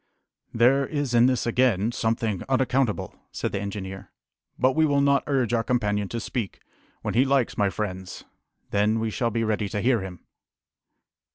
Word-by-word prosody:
"There 130 +4 +3
is 145 -4 -2
in 120 +1 +6
this, 130 -2 0
again, 120 -3 +2
something 115 -4 -1
unaccountable," 130 -3 +1 0.2
said - - -3
the 100 - -2
engineer; 95 -1 -6 0.5
"but 130 0 +2
we 160 - +3
will 145 -2 +3
not 140 0 +3
urge 130 -5 +1
our 115 -1 +2
companion 105 -5 0
to 115 - -3
speak. 110 -2 -4 0.4
When - - -2
he 125 - +4
likes, 135 -3 +1
my 100 -1 +2
friends, 95 -2 -5 0.5
then 105 +2 +2
we 110 0 -1
shall 115 +2 0
be 115 0 -1
ready 105 -2 -1
to 105 - -2
hear 120 0 +2
him!" 95 -3 -8
115 Hz, 170 wpm, -25 LUFS, 105-130 Hz, 0.5 s, in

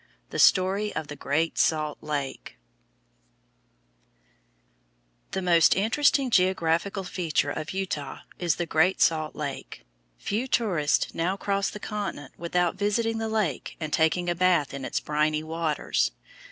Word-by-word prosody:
THE - - -3
STORY 195 +3 +3
OF 160 - -3
GREAT 160 +4 0
SALT 155 -2 +1
LAKE 145 -3 -4 2.7
The 190 - -3
most 170 -2 +5
interesting 255 +5 +2
geographical 185 0 +1
feature 165 -5 -1
of 155 0 -5
Utah 180 -8 -4 0.2
is 170 -3 +1
the 175 - -2
Great 165 +4 +2
Salt 155 -2 +2
Lake. 140 -3 -6 0.3
Few 225 +6 -2
tourists 180 - +1
now 180 +4 -1
cross 200 0 0
the 210 - -8
continent 195 -11 -5
without 175 +1 0
visiting 225 +3 0
the 225 0 -2
lake 210 - -2
and 155 -2 -4
taking 165 +2 +2
a 175 - +2
bath 175 -5 +2
in 135 -1 -5
its - - -1
briny 150 +1 0
waters. 160 -1 0
175 Hz, 130 wpm, -26 LUFS, 155-195 Hz, 2.7 s, most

